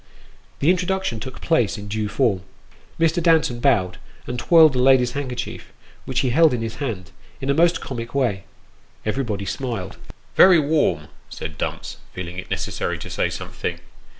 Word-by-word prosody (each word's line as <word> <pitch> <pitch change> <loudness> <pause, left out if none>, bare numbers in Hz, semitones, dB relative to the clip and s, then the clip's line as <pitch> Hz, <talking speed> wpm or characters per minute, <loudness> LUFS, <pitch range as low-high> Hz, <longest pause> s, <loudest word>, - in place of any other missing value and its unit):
The 150 +5 +5
introduction 185 - -1
took 130 +4 -8
place 125 -10 +1
in 105 0 -8
due 105 0 -2
form. 105 -6 +1 0.6
Mr. 165 +1 +2
Danton 160 -7 +3
bowed, 95 -9 +2 0.3
and 125 0 -4
twirled 160 +1 +6
a - - +1
lady's 125 -1 +4
handkerchief, 130 -4 -5 0.3
which 130 0 0
he 130 -3 0
held 160 0 +5
in 115 - -3
his 110 -1 -5
hand, 100 -10 -4 0.3
in 135 +1 -1
a - - +3
most 170 +2 +3
comic 115 -1 -6
way. 115 -8 0 0.6
Everybody 110 -4 -2
smiled. 110 -6 -4 0.2
" - - -34
Very 185 -2 +8
warm," 155 0 +1 0.2
said 80 -1 -7
Dumps, - - -4 0.2
feeling 90 0 -5
it - - -9
necessary - - -2
to - - -8
say - - 0
something. - - -5
125 Hz, 165 wpm, -22 LUFS, 105-155 Hz, 0.6 s, Very